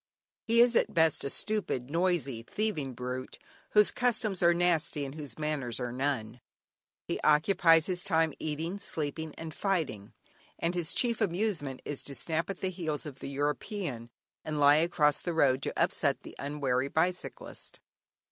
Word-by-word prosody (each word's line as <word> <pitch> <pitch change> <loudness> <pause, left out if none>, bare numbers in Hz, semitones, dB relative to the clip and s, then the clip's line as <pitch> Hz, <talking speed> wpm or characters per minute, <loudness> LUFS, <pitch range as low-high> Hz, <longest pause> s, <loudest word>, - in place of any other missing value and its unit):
He 235 0 +4
is 240 0 +5
at 215 - +2
best 160 -2 +3
a 140 - -2
stupid, 170 - -2
noisy, 165 -8 0
thieving 150 - -2
brute, 125 +1 -5 0.4
whose 210 -1 +6
"customs 225 -6 0
are 170 0 +6
nasty 170 -4 +1
and 135 - -7
whose 145 -6 -7
manners 145 -6 -2
are 125 -1 -3
none;" 125 -3 -2 0.7
he - - -2
occupies 165 +1 +5
his 180 -1 0
time 160 -5 +2
eating, 160 +5 -3
sleeping, 155 -2 -3
and 160 -1 -7
fighting, 160 - -2 0.4
and 170 +1 -1
his 175 -3 +1
chief 235 -2 +1
amusement 175 -9 -1
is 145 - -4
to 140 - -7
snap 160 +7 0
at 195 - -5
the 190 - -1
heels 160 -5 -3
of 140 -3 -8
the - - -6
European, 140 - -3 0.3
and 155 -1 -3
lie 145 +1 +7
across 155 -3 +2
the 175 - -3
road 135 -4 +3
to - - -3
upset - - +1
the - - -10
unwary 135 -2 -1
bicyclist. 175 +5 -2
155 Hz, 160 wpm, -30 LUFS, 140-180 Hz, 0.7 s, lie